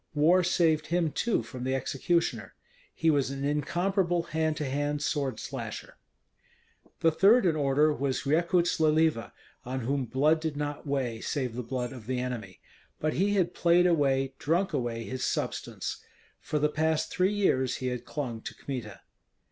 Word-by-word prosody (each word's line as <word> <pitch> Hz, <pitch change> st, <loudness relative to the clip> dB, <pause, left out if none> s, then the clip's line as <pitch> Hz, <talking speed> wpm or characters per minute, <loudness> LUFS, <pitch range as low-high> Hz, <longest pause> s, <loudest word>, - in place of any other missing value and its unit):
War 170 Hz, +5 st, +4 dB
saved 165 Hz, -3 st, +2 dB
him, 170 Hz, -2 st, +1 dB
too, 225 Hz, -, 0 dB
from 125 Hz, +2 st, -8 dB
the 130 Hz, +1 st, 0 dB
executioner. 155 Hz, +6 st, -1 dB, 0.4 s
He 165 Hz, 0 st, +3 dB
was 140 Hz, -3 st, +1 dB
an 135 Hz, 0 st, -4 dB
incomparable 175 Hz, +4 st, 0 dB
hand 160 Hz, -1 st, -1 dB
to 150 Hz, -, -2 dB
hand 145 Hz, +2 st, -1 dB
sword 140 Hz, -3 st, -1 dB
slasher. -, -, -6 dB, 1.1 s
The 165 Hz, -, +4 dB
third 200 Hz, +8 st, +5 dB
in 165 Hz, -3 st, +3 dB
order 150 Hz, +1 st, +3 dB
was 140 Hz, -2 st, -2 dB
Rekuts 170 Hz, +4 st, +2 dB
Leliva, 155 Hz, -5 st, +2 dB, 0.3 s
on 130 Hz, +1 st, -4 dB
whom 135 Hz, +2 st, -1 dB
blood 150 Hz, +7 st, +2 dB
did 155 Hz, -2 st, -3 dB
not 145 Hz, 0 st, -4 dB
weigh, 125 Hz, -5 st, -1 dB
save 130 Hz, -5 st, -2 dB
the 125 Hz, -, -2 dB
blood 125 Hz, +1 st, -4 dB
of 120 Hz, -4 st, -11 dB
the 130 Hz, -1 st, -1 dB
enemy. 115 Hz, -8 st, -5 dB, 0.4 s
But 155 Hz, 0 st, 0 dB
he 200 Hz, +3 st, +1 dB
had 180 Hz, -3 st, +1 dB
played 175 Hz, +1 st, +4 dB
away, 135 Hz, -6 st, +2 dB
drunk 170 Hz, +5 st, 0 dB
away 120 Hz, -4 st, -2 dB
his 130 Hz, +2 st, -5 dB
substance. -, -, -3 dB, 0.4 s
For 150 Hz, -, -2 dB
the 150 Hz, 0 st, +3 dB
past 155 Hz, +1 st, 0 dB
three 185 Hz, +3 st, +2 dB
years 130 Hz, -11 st, +1 dB
he 130 Hz, -1 st, -2 dB
had 125 Hz, -1 st, -4 dB
clung 125 Hz, -7 st, -4 dB
to -, -, -7 dB
Kmita. 115 Hz, -8 st, -6 dB
145 Hz, 165 wpm, -28 LUFS, 130-165 Hz, 1.1 s, third